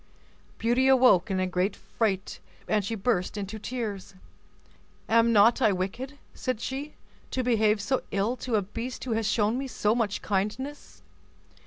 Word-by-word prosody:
Beauty 240 +3 +2
awoke 250 -7 +5
in 190 -1 0
a 185 - +1
great 185 +2 0
fright, 200 -4 -2 0.3
and 210 -1 +1
she 225 +4 -3
burst 195 -2 0
into 205 +2 -5
tears. 210 -5 -5 0.9
"Am 230 +1 +4
not 225 +2 +5
I 215 - +5
wicked," 215 +10 -4 0.2
said 255 -4 -3
she, 275 +5 -5 0.3
"to 255 - -1
behave 220 -3 +3
so 260 +6 0
ill 200 +5 0
to 245 -2 -2
a 205 - +2
beast 230 +6 -6
who 255 - -4
has 225 -1 0
shown 215 +3 +1
me 270 - -3
so 215 -3 +1
much 225 -4 -1
kindness? 215 +9 -3
220 Hz, 160 wpm, -27 LUFS, 200-250 Hz, 0.9 s, awoke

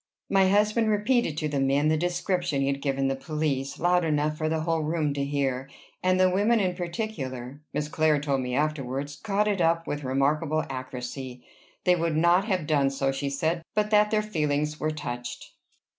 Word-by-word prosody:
My 195 -1 +4
husband 215 +3 +3
repeated 210 - +1
to 155 - -1
the 145 -2 -1
men 140 +3 +2
the 155 - +3
description 175 -2 -1
he - - +2
had 140 0 -1
given 135 -1 0
the 135 - 0
police, 140 -2 -2
loud 180 +1 +3
enough 150 -1 +1
for 155 0 -1
the 160 0 0
whole 165 0 0
room 155 -1 0
to 140 0 -2
hear; 135 -2 -1 0.3
and 185 0 +2
the 185 - +6
women 205 +5 +3
in 185 -3 +1
particular, 150 - -5
Miss 150 - -2
Clare 155 -1 +2
told 140 -2 0
me 125 0 -3
afterwards, 145 -1 -2
caught 210 +2 0
it 200 -3 0
up 165 0 +2
with 145 0 -4
remarkable 145 +4 +1
accuracy. 130 -1 -6 0.4
They 180 -1 +4
would 165 -2 0
not 175 +4 +4
have 185 -7 -1
done 145 -3 +2
so, 135 0 0
she 135 +1 -3
said, 160 +5 -1
but 210 0 +1
that 210 0 +5
their 215 0 +1
feelings 150 -6 -1
were 155 - 0
touched. 120 -5 -6
155 Hz, 190 wpm, -27 LUFS, 140-180 Hz, 0.4 s, the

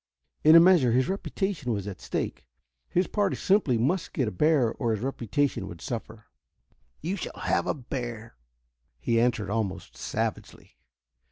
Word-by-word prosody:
In 155 +2 +8
a - - +11
measure 165 -9 +5
his 130 +1 +3
reputation 190 -7 -2
was 100 -4 -2
at 95 -4 -7
stake. - - -4 0.4
His 180 +2 +2
party 205 0 0
simply 190 - +2
must 155 +11 0
get 130 -6 0
a - - -2
bear, 135 - +2
or 115 -4 -1
his 105 - -7
reputation 130 -3 -1
would 85 -2 -9
suffer. 110 0 -6 0.8
"You 175 +6 -2
shall 185 - -6
have - - +1
a - - 0
bear," 120 -4 -6 0.6
he 115 +6 +2
answered 110 -5 0
almost 105 -3 -3
savagely. - - -4
125 Hz, 155 wpm, -27 LUFS, 110-160 Hz, 0.8 s, a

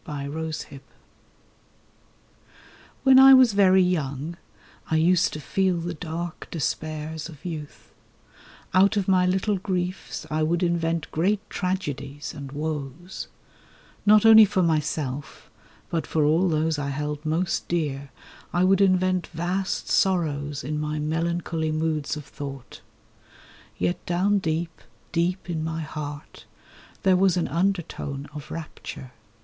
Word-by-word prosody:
THE 155 - -8
UNDERTONE 145 0 -5 2.2
WHEN 265 -1 +7
I 270 0 +10
was 255 -4 +6
very 190 -2 +5
young 155 -3 -2 0.5
I 160 - +1
used 175 +3 +3
to 150 - -5
feel 190 +3 0
the 170 +1 -3
dark 170 0 -6
despairs 155 0 -3
of 155 -1 -14
youth; 155 -4 -7 0.8
Out 195 +3 +4
of 195 - 0
my 185 -1 +4
little 190 +3 +1
griefs 185 -1 -3
I 155 +1 0
would 170 +3 +1
invent 170 -2 0
great 200 +6 0
tragedies 145 -6 -3
and 140 -3 -8
woes; 150 +3 -5 0.8
Not 210 +1 +6
only 220 0 +10
for 200 -2 +2
myself, 150 -4 -2 0.4
but 165 -2 -1
for 155 - +1
all 165 +5 +3
those 155 -1 0
I 140 -1 -2
held 150 +1 -3
most 165 +3 -1
dear 145 -5 -2 0.4
I 175 - +2
would 195 +1 +4
invent 185 -1 +2
vast 180 +4 -2
sorrows 150 -7 0
in 150 +3 -3
my 150 0 -2
melancholy 160 +1 -1
moods 155 -1 -1
of 150 - -8
thought. 140 -3 -8 1.0
Yet 90 0 -1
down 195 +4 +2
deep, 165 -3 -3 0.3
deep 180 +3 -1
in 160 -3 -2
my 160 0 -3
heart 150 -1 -7 0.6
there 190 -1 +5
was 185 -1 +3
an 175 - 0
undertone 165 -5 -2
of 150 0 -8
rapture. 155 -4 -8
165 Hz, 130 wpm, -25 LUFS, 150-185 Hz, 2.2 s, I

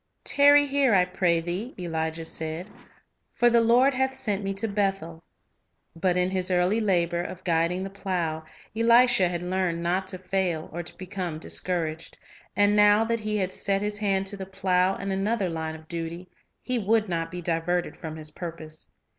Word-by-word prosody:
"Tarry 290 0 +5
here, 275 -5 +2
I 180 -1 +4
pray 175 -2 +1
thee," 180 +9 -4
Elijah 160 -2 -3
said; 160 +5 -5 0.6
"for 240 0 +4
the 235 0 +5
Lord 245 +4 +4
hath 265 +1 0
sent 210 -7 -2
me 195 - -2
to 215 +3 -2
Bethel." 195 -5 -2 0.7
T 165 - -15
^t - - -22
But 180 -1 +2
in 180 +1 +1
his 185 -1 0
early 185 +5 +2
labor 175 -4 +1
of 185 +1 -7
guiding 170 +2 +1
the 195 - -6
plow, 175 -5 -3 0.3
Elisha 230 -3 +5
had 175 0 -4
learned 180 -2 -1
not 185 +2 0
to 185 - -4
fail 180 -3 -2
or 175 - -3
to 175 - -9
become 185 -3 -5
discouraged; 165 -1 -3 0.4
and 205 0 +4
now 210 +1 +5
that 230 0 -1
he 215 0 -2
had 185 -2 -1
set 195 0 -1
his 210 0 -3
hand 195 -2 +1
to 200 +1 -6
the 190 -1 -7
plow 185 0 +1
in 195 0 -4
another 195 0 0
line 160 -1 -4
of 160 0 -14
duty, 170 +1 -5 0.4
he 250 -1 -1
would 220 +1 +2
not 165 -2 -2
be 180 +1 -6
diverted 170 +1 -1
from 160 -2 -7
his 155 -1 -4
purpose. 160 -1 -8
185 Hz, 190 wpm, -26 LUFS, 170-205 Hz, 0.7 s, Tarry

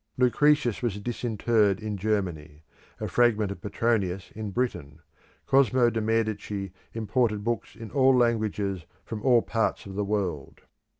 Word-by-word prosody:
Lucretius 125 -1 +3
was 110 -5 -2
disinterred 110 -2 +1
in 110 -1 -4
Germany; 90 -8 -3 0.4
a - - -3
fragment 110 -4 +2
of 100 - -8
Petronius 100 -3 -1
in 110 -1 -5
Britain. 90 - -3 0.5
Cosmo 130 -3 +4
de' 115 0 -1
Medici 105 -3 -1 0.2
imported 110 -1 0
books 115 -3 -3
in 115 -2 -9
all 130 -2 +4
languages 105 -6 0 0.2
from 110 -2 -6
all 120 -2 +4
parts 115 -1 -1
of 100 - -8
the 105 +2 -1
world. 95 -9 -3
110 Hz, 135 wpm, -27 LUFS, 100-120 Hz, 0.5 s, Cosmo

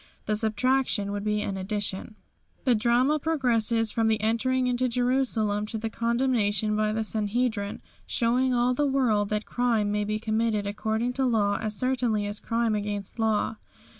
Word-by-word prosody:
The 215 - 0
subtraction 220 -1 +1
would 205 0 -3
be 210 0 0
an 195 -2 -3
addition. 205 +1 -3 0.5
The 255 - +4
drama 245 +6 +2
progresses 235 -7 +1
from 225 -2 +1
the 220 -1 +2
entering 250 +4 +1
into 250 0 +1
Jerusalem 240 -4 +1
to 220 - -4
the 220 0 -4
condemnation 230 -4 +1
by 215 0 +1
the 220 +1 -1
Sanhedrim, 215 -1 -1 0.3
showing 250 +2 +1
all 245 0 +2
the 290 +3 +1
world 230 -7 +1
that 210 0 -1
crime 230 -4 0
may 210 0 0
be 215 +1 -1
committed 220 -1 0
according 220 +4 -1
to 265 +1 0
law 205 -4 +1
as 215 -1 -2
certainly 245 -4 0
as 205 +1 -4
crime 230 -1 0
against 205 -1 -3
the - - -3
law. 220 0 +1
220 Hz, 165 wpm, -26 LUFS, 210-245 Hz, 0.5 s, The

